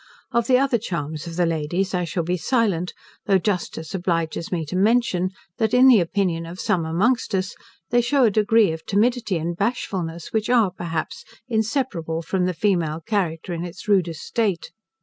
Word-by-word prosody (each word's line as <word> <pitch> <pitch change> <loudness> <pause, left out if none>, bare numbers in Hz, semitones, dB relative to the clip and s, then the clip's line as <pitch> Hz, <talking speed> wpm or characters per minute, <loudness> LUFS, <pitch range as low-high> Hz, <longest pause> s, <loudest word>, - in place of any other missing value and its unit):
Of 235 -2 +1
the 255 - +5
other 265 -3 +2
charms 160 -6 -4
of 165 - -6
the 175 0 +2
ladies 165 +4 -1
I 180 -1 0
shall 170 +1 -2
be 175 +2 0
silent, 185 -2 0 0.3
though 195 -2 +5
justice 175 -4 -3
obliges 170 -3 -2
me 165 -3 -1
to 165 - -5
mention, 195 -3 +2 0.3
that, 220 +2 +2
in 255 +1 +7
the 245 -5 +8
opinion 170 -2 -1
of 175 +2 -9
some 170 -3 0
amongst 215 +7 +1
us, 190 0 -1 0.4
they 240 0 +4
shew 260 +3 +2
a 225 - +5
degree 215 -1 +4
of 160 0 -6
timidity 220 -1 +1
and 170 +2 -3
bashfulness, 170 -7 -3
which 220 0 0
are, 230 -6 +4
perhaps, 165 -3 -4 0.2
inseparable 220 - -1
from 180 +2 0
the 180 -1 -1
female 170 -4 0
character 175 -2 -2
in 170 0 -3
its 180 +2 -8
rudest 175 -6 +1
state. 205 -7 -1
185 Hz, 180 wpm, -23 LUFS, 165-220 Hz, 0.4 s, the